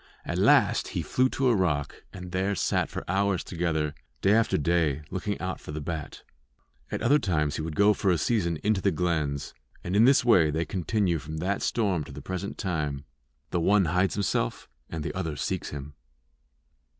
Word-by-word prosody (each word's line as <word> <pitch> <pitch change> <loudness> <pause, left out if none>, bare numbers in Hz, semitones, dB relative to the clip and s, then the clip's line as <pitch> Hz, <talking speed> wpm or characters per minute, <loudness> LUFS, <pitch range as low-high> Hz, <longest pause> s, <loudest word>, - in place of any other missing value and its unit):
At - - -2
last - - +4
he - - 0
flew 130 +1 +2
to 135 0 0
a 120 - +4
rock, 75 -7 -1
and 90 -1 -9
there 95 +2 0
sat - - 0
for - - -5
hours 95 0 +1
together, 80 -4 -1 0.3
day 100 - +4
after 115 +1 +3
day, 75 -2 +1
looking - - -3
out - - -3
for - - -9
the 75 - -4
bat. 80 0 -6 0.7
At - - -3
other 145 +5 +5
times 75 - 0
he - - -2
would 80 -1 -4
go 100 +3 +5
for 100 - 0
a 90 - +3
season 85 -2 0
into 105 -2 +2
the 100 - +3
glens; 80 -5 -1 0.3
and 90 - -2
in 110 +3 +6
this 135 -1 +5
way 90 -10 +5
they 80 +3 -1
continue 90 +1 0
from 80 +2 -7
that 95 +5 -1
storm 100 -9 0
to - - -11
the 70 - -8
present 95 +6 -5
time 75 -6 -2 0.5
the 85 - +1
one 95 +3 +4
hides 90 +4 +1
himself, 100 -11 -1 0.2
and 80 -2 -4
the - - -4
other 80 -5 -3
seeks 70 - -3
him. 75 0 -7
85 Hz, 195 wpm, -27 LUFS, 75-100 Hz, 0.7 s, in